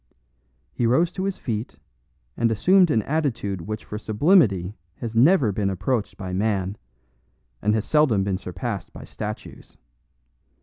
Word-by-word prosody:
He 120 - 0
rose 165 +9 +3
to 190 +1 -3
his 195 -1 -2
feet, 110 -1 -4 0.6
and 115 -1 +1
assumed 180 - +4
an 110 -7 +2
attitude 120 - -2
which 110 +6 -6
for 105 - -6
sublimity 105 - +3 0.2
has 115 -1 -6
never 130 - +5
been 100 0 -1
approached 105 +4 -2
by 95 -2 -6
man, 100 -1 0 0.9
and 105 +1 +2
has 110 - -1
seldom 145 -10 +3
been 95 -1 -1
surpassed 100 +1 -5
by - - -10
statues. - - -8
110 Hz, 140 wpm, -24 LUFS, 100-140 Hz, 0.9 s, never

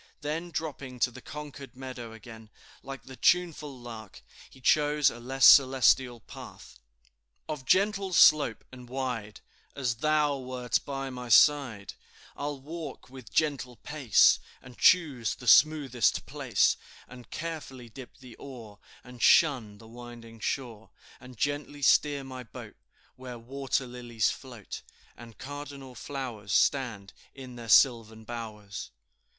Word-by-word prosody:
Then 155 +4 -3
dropping 140 -5 -5
to 125 - +3
the - - -12
Concord 145 -3 -9
meadow 125 -3 -8
again, 115 -1 -12 0.3
like 135 0 -9
the 130 - -11
tuneful 155 -4 +1
lark, 115 -4 -10 0.3
he - - -18
chose 150 +2 +3
a 120 - -10
less 130 +2 +1
celestial 130 -3 +6
path - - -12 0.7
"Of 150 -4 -5
gentle 195 +1 +2
slope 150 -9 +5
and 125 -1 -12
wide, 125 -5 -4 0.3
As 125 -5 -2
thou 150 0 +1
wert 125 -1 -2
by 135 -1 -4
my 125 -1 -7
side; 125 -6 +4 0.4
I'll 145 -1 -4
walk 155 -2 -8
with 130 -3 -12
gentle 140 -5 0
pace, 140 -4 +3 0.2
And 125 -1 -14
choose 140 - +3
the 125 - -13
smoothest 135 -3 +4
place, - - +1 0.3
And 125 -1 -13
careful 155 -7 -6
dip 125 +2 -12
the 125 -3 -13
oar, 115 -7 -11 0.2
And 125 -1 -13
shun 125 -10 +4
the 110 - -15
winding 120 -1 -12
shore, 115 -4 -4 0.3
And 125 -1 -13
gently 145 +2 -3
steer 140 +1 +3
my 130 -1 -8
boat 120 - -11 0.4
Where 125 -1 -8
water 135 +2 -3
lilies 120 -3 -1
float, 120 -7 -9 0.3
And 115 -3 -13
cardinal 140 0 -8
flowers 120 -5 -6
Stand 115 -8 +1 0.2
in 130 -2 -10
their 115 -1 -9
sylvan 110 -2 +4
bowers." 110 -4 -7
130 Hz, 135 wpm, -28 LUFS, 120-145 Hz, 0.7 s, celestial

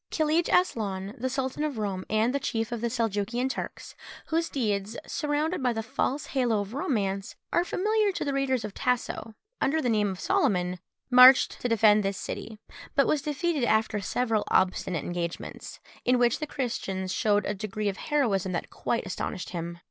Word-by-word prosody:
Kilij 315 +1 +2
Aslaun 200 - +1
the 260 +2 -1
sultan 265 +2 -2
of 295 -5 -2
Roum 195 -3 -3
and 230 +6 +1
chief 225 -1 -2
of 235 -2 -3
the 235 - +1
Seljukian 230 +1 -1
Turks, 265 - -6 0.4
whose 330 +1 +1
deeds, 210 -4 -1
surrounded 300 +2 -1
by 250 -2 +2
the 225 0 -3
false 265 +5 -1
halo 245 -5 +2
of 205 +2 -7
romance, 200 -8 -1 0.2
are 345 - +4
familiar 420 +3 +1
to - - -3
the 280 - -1
readers 265 -4 0
of 210 - -6
Tasso, 245 -3 -2 0.3
under 310 +4 +2
the 250 -6 +1
name 210 -2 +2
of 190 -1 -5
Soliman, 180 -1 +1 0.3
marched 250 +1 +7
to 245 - -1
defend 215 -2 +5
this 195 -1 -2
city, 220 - -6 0.4
but 275 - +5
was 300 - +1
defeated 300 0 -1
after 220 -2 +2
several 225 +1 0
obstinate 185 -3 +1
engagements, 175 -1 -5 0.2
in 250 +1 +3
which 240 -1 +2
the 305 - -3
Christians 195 -9 -3
shewed 205 +2 +2
a 205 - -1
degree 210 +1 -3
of 195 - -1
heroism 210 - 0
that 175 - -3
quite 230 - -2
astonished 185 -1 -4
him. 170 -1 -5
230 Hz, 175 wpm, -27 LUFS, 200-270 Hz, 0.4 s, marched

